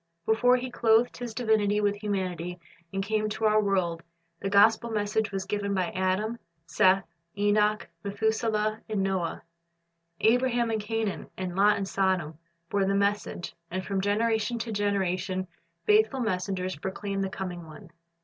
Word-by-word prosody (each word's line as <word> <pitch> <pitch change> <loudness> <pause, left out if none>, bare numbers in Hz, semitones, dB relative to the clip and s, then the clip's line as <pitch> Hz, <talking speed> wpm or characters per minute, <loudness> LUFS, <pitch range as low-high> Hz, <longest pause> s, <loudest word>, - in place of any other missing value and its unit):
Before 245 +3 +4
He 255 0 -5
clothed 230 0 +3
His 245 -2 -5
divinity 215 -4 +2
with 205 -1 +1
humanity 180 -4 -3 0.3
and 195 0 -2
came 215 +1 0
to 220 +1 -2
our 215 0 +4
world, 185 -5 0 0.4
the 195 - -2
gospel 220 +3 +5
message 215 0 0
was 195 -1 -3
given 200 0 -1
by 185 +1 0
Adam, 200 +4 -1 0.3
Seth, 185 +4 +3 0.3
Enoch, 210 +1 +2 0.2
Methuselah, 215 +1 0
and 205 -3 0
Noah. 190 -4 -1 0.8
Abraham 240 0 +2
in 220 - 0
Canaan 215 -1 -3
and 185 -1 -4
Lot 205 +2 +4
in 195 - -2
Sodom 185 -5 0 0.3
bore 200 -1 +2
the 195 +1 +1
message, 200 -3 -1 0.2
and 185 +1 -4
from 195 0 -1
generation 220 +3 +1
to 230 0 -4
generation 190 -2 0 0.4
faithful 425 -10 +4
messengers 185 -4 -1
proclaimed 195 +3 -3
the 195 - -2
Coming 175 -2 -6
One. 170 +3 -13
205 Hz, 150 wpm, -28 LUFS, 190-220 Hz, 0.8 s, gospel